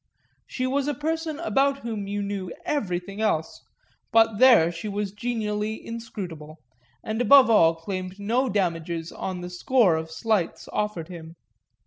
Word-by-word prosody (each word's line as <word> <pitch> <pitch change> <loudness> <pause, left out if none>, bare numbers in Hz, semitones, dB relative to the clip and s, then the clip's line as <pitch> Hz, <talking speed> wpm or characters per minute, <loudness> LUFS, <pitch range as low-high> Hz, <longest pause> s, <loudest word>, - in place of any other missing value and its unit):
She 255 - -3
was 275 +2 0
a 295 - -1
person 320 +1 -2
about 275 -4 +1
whom 220 -4 -4
you 205 0 -2
knew 200 -3 -4
everything 200 -7 -2
else, 160 -8 -1 0.5
but 225 -2 +4
there 235 -11 +7
she 170 +5 -6
was 205 -1 -3
genially 210 -1 -2
inscrutable, 180 -10 -7 0.5
and 220 +2 -2
above 270 -1 +7
all 165 -6 +5
claimed 185 +3 -6
no 240 +6 +1
damages 170 -4 -2
on 185 -1 -5
the 175 - -6
score 195 0 +3
of 160 0 -5
slights 195 +1 -1
offered 210 -6 -2
him. 165 -2 -10
205 Hz, 145 wpm, -25 LUFS, 175-235 Hz, 0.5 s, there